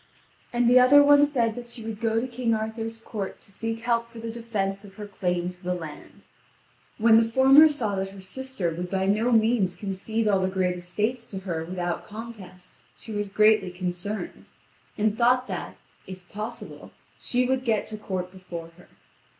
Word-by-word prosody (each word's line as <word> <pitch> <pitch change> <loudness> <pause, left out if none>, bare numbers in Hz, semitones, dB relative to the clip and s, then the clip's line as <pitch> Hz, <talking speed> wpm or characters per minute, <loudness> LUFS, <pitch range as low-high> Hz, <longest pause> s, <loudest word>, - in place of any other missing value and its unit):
And 240 0 +2
the 250 +1 +7
other 280 +3 +7
one 290 0 +6
said 235 -6 +1
that 240 +1 -9
she 235 -1 -9
would 225 -1 -6
go 225 -1 +1
to 250 - -2
King 240 -2 0
Arthur's 225 +1 -4
court 210 -3 -6
to - - -20
seek 225 +3 -4
help 235 0 0
for 235 - -14
the 225 0 -5
defence 210 -4 -3
of 195 -1 -13
her 210 - -7
claim 180 -3 -2
to 180 0 -20
the 180 -1 -2
land. 160 -4 -10 0.7
When 225 0 +6
the 225 0 0
former 270 +5 +8
saw 250 -9 -1
that 190 0 -2
her 195 0 -12
sister 195 -2 -3
would 175 +2 -5
by 190 0 0
no 215 +5 +2
means 220 -5 +3
concede 215 +2 -2
all 200 -2 +3
the 190 0 -1
estates 210 +7 -3
to 195 - -5
her 170 -4 -3
without 175 0 -3
contest, 210 -5 -10 0.2
she 225 - -10
was 205 -1 -2
greatly 210 -1 +4
concerned, 180 +3 -5 0.5
and 215 0 +1
thought 250 +2 +3
that, - - -6 0.3
if 185 -1 -10
possible, 225 +3 -7 0.3
she 250 0 +1
would 260 0 0
get 225 -4 +1
to 215 - -6
court 185 -3 -4
before 175 -3 -8
her. - - -17
215 Hz, 185 wpm, -26 LUFS, 190-235 Hz, 0.7 s, former